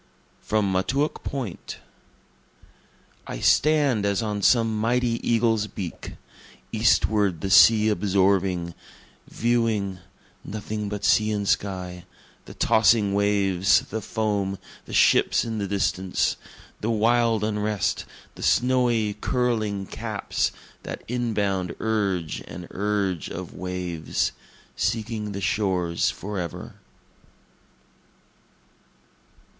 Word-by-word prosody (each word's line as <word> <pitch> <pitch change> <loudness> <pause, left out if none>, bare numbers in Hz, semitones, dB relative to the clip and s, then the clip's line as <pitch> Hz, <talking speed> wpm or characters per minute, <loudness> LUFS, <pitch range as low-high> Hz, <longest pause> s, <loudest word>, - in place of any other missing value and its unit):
From 105 -2 0
Montauk 135 +11 0
Point 125 -10 -5 1.5
I - - -5
stand 145 - +3
as 100 +1 0
on 105 -2 -2
some 115 0 +3
mighty 120 +1 +1
eagle's 115 -2 +1
beak, 95 -3 -7 0.6
Eastward 100 -6 +2
the 95 - -2
sea 110 +2 +7
absorbing, 95 -4 +1 0.5
viewing, 110 -5 0 0.4
(nothing 105 0 -5
but 105 0 -4
sea 110 0 +4
and 100 -1 -2
sky,) 90 -3 -2 0.4
The - - -11
tossing 110 -2 +3
waves, 100 -2 +3
the 110 +1 -3
foam, 100 -2 -1 0.3
the - - -10
ships - - +4
in 110 -2 -3
the 100 - -2
distance, 95 -1 0 0.4
The 110 - -2
wild 115 0 +2
unrest, 105 -2 -1 0.3
the - - -12
snowy, 120 -4 +2
curling 110 -5 0
caps - - -2 0.3
that - - -7
inbound 105 -7 -1
urge 100 -8 -1
and 90 0 -8
urge 100 -3 -1
of - - -7
waves, 90 -3 -2 0.4
Seeking 110 -2 -2
the 100 - -5
shores 90 -4 0
forever. 95 -5 -5
105 Hz, 100 wpm, -24 LUFS, 95-110 Hz, 1.5 s, sea